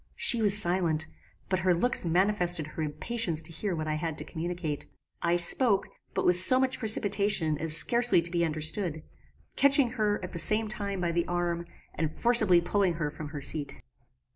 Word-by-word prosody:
"She 235 Hz, -3 st, +5 dB
was 205 Hz, -1 st, +5 dB
silent, 175 Hz, -5 st, 0 dB, 0.4 s
but 185 Hz, -1 st, -2 dB
her 180 Hz, -1 st, 0 dB
looks 240 Hz, +3 st, +1 dB
manifested 175 Hz, -1 st, +1 dB
her 155 Hz, +1 st, -9 dB
impatience 160 Hz, +4 st, -2 dB
to 160 Hz, -, -6 dB
hear 180 Hz, +3 st, -5 dB
what 155 Hz, -1 st, -6 dB
I 155 Hz, -, -2 dB
had 160 Hz, -3 st, -5 dB
to -, -, -5 dB
communicate. 165 Hz, -3 st, -6 dB, 0.3 s
I 170 Hz, 0 st, 0 dB
spoke, 195 Hz, +4 st, +1 dB, 0.3 s
but -, -, -2 dB
with 180 Hz, 0 st, +3 dB
so 255 Hz, +8 st, +6 dB
much 260 Hz, 0 st, -2 dB
precipitation 205 Hz, -7 st, +1 dB
as 160 Hz, 0 st, 0 dB
scarcely 240 Hz, +2 st, +2 dB
to 170 Hz, -, -4 dB
be 170 Hz, -1 st, -1 dB
understood; 160 Hz, +1 st, -2 dB, 0.5 s
catching 280 Hz, -3 st, +2 dB
her, 210 Hz, -4 st, -2 dB
at 180 Hz, -, -8 dB
the 170 Hz, -, -6 dB
same 215 Hz, +6 st, +4 dB
time, 200 Hz, -3 st, -4 dB
by 170 Hz, -1 st, -2 dB
the 170 Hz, 0 st, -3 dB
arm, 175 Hz, -1 st, -4 dB, 0.3 s
and 160 Hz, -, -3 dB
forcibly 215 Hz, -2 st, +3 dB
pulling 190 Hz, +1 st, -1 dB
her 150 Hz, -3 st, -4 dB
from 155 Hz, 0 st, -9 dB
her 145 Hz, -1 st, -9 dB
seat. 145 Hz, +1 st, +4 dB
175 Hz, 185 wpm, -26 LUFS, 160-210 Hz, 0.5 s, so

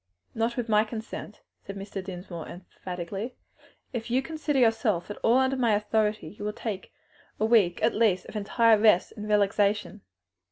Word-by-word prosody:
"Not 230 Hz, +2 st, -1 dB
with 240 Hz, -1 st, -2 dB
my 215 Hz, -1 st, +4 dB
consent," 220 Hz, -1 st, -7 dB, 0.2 s
said 195 Hz, -, -7 dB
Mr. 195 Hz, -1 st, -6 dB
Dinsmore 180 Hz, -3 st, -7 dB
emphatically; 180 Hz, +5 st, -7 dB, 0.6 s
"if 235 Hz, -1 st, -4 dB
you 255 Hz, +3 st, +1 dB
consider 305 Hz, -2 st, -2 dB
yourself 225 Hz, -6 st, +2 dB
at -, -, -7 dB
all 235 Hz, +2 st, +3 dB
under 265 Hz, 0 st, +2 dB
my 235 Hz, -4 st, +3 dB
authority 210 Hz, 0 st, 0 dB
you 205 Hz, -, -10 dB
will 210 Hz, 0 st, -2 dB
take 210 Hz, -3 st, -5 dB, 0.5 s
a 215 Hz, -, +2 dB
week 210 Hz, -7 st, +3 dB
at -, -, +3 dB
least 210 Hz, -5 st, +2 dB
of -, -, -11 dB
entire 220 Hz, +1 st, +3 dB
rest 210 Hz, -4 st, +4 dB
and 210 Hz, -1 st, -6 dB
relaxation." 205 Hz, -1 st, +1 dB
210 Hz, 165 wpm, -27 LUFS, 200-230 Hz, 0.6 s, my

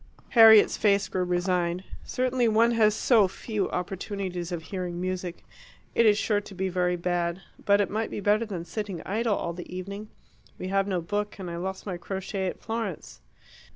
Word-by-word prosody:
Harriet's 220 Hz, -3 st, +8 dB
face 200 Hz, -2 st, +3 dB
grew 185 Hz, -1 st, -1 dB
resigned. 180 Hz, 0 st, 0 dB, 0.2 s
"Certainly 255 Hz, -1 st, 0 dB
one 225 Hz, +2 st, +4 dB
has 215 Hz, -2 st, +3 dB
so 220 Hz, -3 st, +4 dB
few 205 Hz, +1 st, -3 dB
opportunities 180 Hz, -1 st, -4 dB
of 170 Hz, -2 st, -4 dB
hearing 175 Hz, 0 st, -4 dB
music. 185 Hz, -1 st, -4 dB, 0.5 s
It 230 Hz, -, +4 dB
is 205 Hz, -1 st, +5 dB
sure 210 Hz, -1 st, +1 dB
to 200 Hz, -, -12 dB
be 190 Hz, +1 st, -1 dB
very 180 Hz, 0 st, +1 dB
bad. 175 Hz, +1 st, -1 dB, 0.2 s
But 200 Hz, 0 st, +4 dB
it 200 Hz, -, 0 dB
might 220 Hz, +2 st, -1 dB
be -, -, -5 dB
better 210 Hz, +3 st, +2 dB
than 180 Hz, -5 st, -5 dB
sitting 195 Hz, -1 st, -5 dB
idle 220 Hz, +2 st, 0 dB
all 170 Hz, -, -3 dB
the 175 Hz, 0 st, -9 dB
evening. 200 Hz, +4 st, -6 dB, 0.5 s
We 185 Hz, -, -5 dB
have 195 Hz, 0 st, +1 dB
no 185 Hz, -3 st, -1 dB
book, 205 Hz, +4 st, -3 dB
and 185 Hz, -3 st, -6 dB
I 170 Hz, -, -5 dB
lost 190 Hz, +2 st, -5 dB
my 185 Hz, -4 st, -4 dB
crochet 190 Hz, +2 st, -4 dB
at -, -, -5 dB
Florence." 225 Hz, -6 st, -5 dB
195 Hz, 185 wpm, -27 LUFS, 180-210 Hz, 0.5 s, Harriet's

